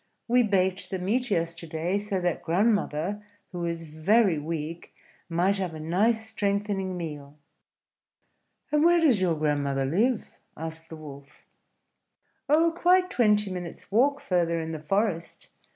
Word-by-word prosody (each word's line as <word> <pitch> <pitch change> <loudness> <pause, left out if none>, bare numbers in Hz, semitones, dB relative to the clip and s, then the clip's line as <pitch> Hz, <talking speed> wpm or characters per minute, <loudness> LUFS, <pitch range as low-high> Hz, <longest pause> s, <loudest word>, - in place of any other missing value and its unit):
"We 245 +1 +4
baked 190 -3 +1
the 190 - -2
meat 230 +8 -1
yesterday, 165 0 -1
so 205 -2 -2
that 175 -1 -1
grandmother, 200 0 0 0.3
who 175 -2 -4
is 170 0 -3
very 170 +3 +2
weak, 160 +2 -5 0.3
might 180 +4 +1
have 180 -4 -3
a - - -7
nice 210 +8 +1
strengthening 200 -3 -1
meal." 150 -4 -7 1.3
"And 300 0 +3
where 345 +1 +5
does 270 - +3
your 175 -3 +2
grandmother 145 -3 0
live?" 215 - 0 0.3
asked 160 0 -7
the 160 - -7
Wolf. 140 -2 -12 1.0
"Oh, 325 +3 +4
quite 365 +2 +3
twenty 210 - +3
minutes' 180 0 -7
walk 275 +7 +3
further 170 -5 0
in 160 0 -4
the 160 - -5
forest. 170 0 -2
185 Hz, 135 wpm, -27 LUFS, 160-210 Hz, 1.3 s, where